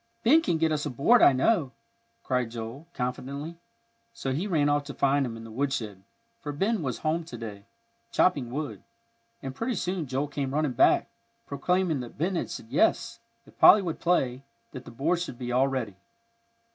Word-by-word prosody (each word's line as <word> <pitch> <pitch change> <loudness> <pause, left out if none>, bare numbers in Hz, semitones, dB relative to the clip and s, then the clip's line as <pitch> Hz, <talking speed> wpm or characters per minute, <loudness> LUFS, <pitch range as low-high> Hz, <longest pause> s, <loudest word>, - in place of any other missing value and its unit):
"Ben 300 +8 +6
can 170 - 0
get 160 0 +1
us 150 -2 -1
a - - -3
board, 145 - +4
I - - +8
know," 135 - +1 0.5
cried 125 -2 0
Joel, 115 +7 -7
confidently; 140 +5 -4 0.6
so 135 - -3
he 170 +9 -2
ran 155 -7 +2
off 145 0 +2
to 145 - -8
find 140 +1 +2
him 115 -1 -7
in 115 - -10
the 115 - -10
woodshed, 110 -6 -3 0.4
for 145 - -4
Ben 195 +8 0
was 130 -6 -3
home 165 +2 +1
to 125 -7 -8
day, 105 -3 -8 0.4
chopping 145 -10 +2
wood. 125 -6 -5 0.6
And 135 -1 -5
pretty 230 - -2
soon 180 -4 -2
Joel 135 +3 -1
came 140 -1 -3
running 150 -2 +1
back, - - +4 0.4
proclaiming 170 +2 0
that 120 -2 -8
Ben 180 +6 0
had - - -2
said - - -8
yes, - - +1 0.3
if - - -21
Polly 205 - +8
would 165 -3 -4
play, 135 -8 +1 0.3
that 130 -1 -9
the - - -9
board 150 +9 0
should 175 -8 -5
be 125 0 -5
all 130 +2 +3
ready. 125 -8 -3
140 Hz, 190 wpm, -27 LUFS, 125-165 Hz, 0.6 s, I